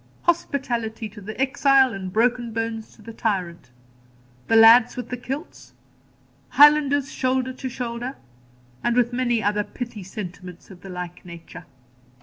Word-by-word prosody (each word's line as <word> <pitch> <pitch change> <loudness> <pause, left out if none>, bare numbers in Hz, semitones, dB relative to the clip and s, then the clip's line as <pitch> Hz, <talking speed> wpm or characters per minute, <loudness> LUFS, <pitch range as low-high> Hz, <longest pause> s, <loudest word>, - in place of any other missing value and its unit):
'Hospitality 240 -9 -1
to 210 0 -13
the 215 +4 -8
exile, 270 -1 +3
and 190 -1 -6
broken 240 +2 +1
bones 225 0 -4
to 215 - -18
the 230 - -10
tyrant.' 185 - -3 0.8
'The 225 - +2
lads 225 +2 +7
with 245 -2 -5
the 250 - -3
kilts.' 270 +7 -8 0.8
'Highlanders, 285 -2 +5
shoulder 260 0 -1
to 260 0 -6
shoulder,' 245 +1 -5 0.8
with 245 -1 +2
many 240 -3 0
other 210 +1 +1
pithy 240 -1 -7
sentiments 185 -1 -9
of 180 -2 -14
the 195 - -10
like 180 -1 -7
nature. 170 0 -11
230 Hz, 135 wpm, -23 LUFS, 205-255 Hz, 0.8 s, lads